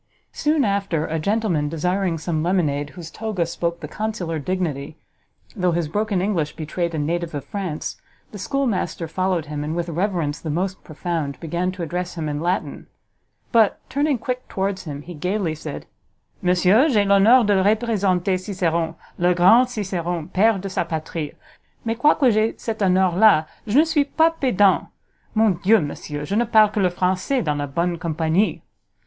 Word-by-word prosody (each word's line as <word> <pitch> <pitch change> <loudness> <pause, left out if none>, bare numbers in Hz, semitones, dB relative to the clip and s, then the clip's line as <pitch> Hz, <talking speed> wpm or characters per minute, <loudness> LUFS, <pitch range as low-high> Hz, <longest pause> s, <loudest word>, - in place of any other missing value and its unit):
Soon 300 -2 +1
after, 195 -6 0
a 160 +1 -2
gentleman 185 -5 0
desiring 180 +2 -1
some 160 0 -2
lemonade 155 -5 0
whose 165 -2 -8
toga 210 -6 -2
spoke 170 0 -3
the 150 - -5
consular 185 -5 -3
dignity, 155 -3 -3 0.6
though 180 -4 +1
his 170 -2 0
broken 205 +2 -1
English 170 -7 -1
betrayed 165 +1 -3
a - - -2
native 165 +2 -2
of 145 - -5
France, 190 -7 -5 0.3
the 205 - -8
schoolmaster 195 - -1
followed 180 0 -1
him, 150 -1 -4
and, 155 +2 -3
with 170 0 -2
reverence 170 -4 -1
the 160 - -6
most 185 +5 -2
profound, 155 -3 -4
began 175 +3 -2
to 185 -2 -6
address 180 +2 -4
him 160 -2 -3
in 145 -1 -2
Latin; 180 +3 -2 0.6
but, 225 -4 +4
turning 285 0 +1
quick 250 +2 -4
towards 190 -1 -2
him, 145 -2 -6
he 175 - -9
gaily 180 +2 -1
said, 155 - -7 0.6
"_Monsieur, 185 - +4
j'ai 210 -4 +3
l'honneur 200 +6 +6
de 200 -3 +3
representer 200 -4 +1
Ciceron, 170 -4 -1 0.2
le 175 0 +3
grand 220 +9 +6
Ciceron, 175 -7 -3
pere 215 +2 +4
de 195 +1 -5
sa 190 - -1
patrie! 160 -2 -5 0.5
mais 225 0 0
quoique 265 0 +4
j'ai 215 +1 +1
cet 220 -2 -5
honneur 185 -2 +3
la, 195 -6 +5 0.2
je 215 +5 +2
ne 305 - +8
suit 300 -3 0
pas 325 +1 +5
pedant! 215 - +2 0.5
mon 220 -1 +4
dieu, 220 +3 +5
Monsieur, 145 -1 -5
je 195 - -4
ne 240 +2 +3
parle 215 -1 +5
que 210 - -2
le 185 -2 +3
Francois 185 +8 0
dans 150 -3 -1
la 145 - -2
bonne 170 +4 -1
compagnie_!" 165 +4 0
180 Hz, 170 wpm, -22 LUFS, 165-210 Hz, 0.6 s, ne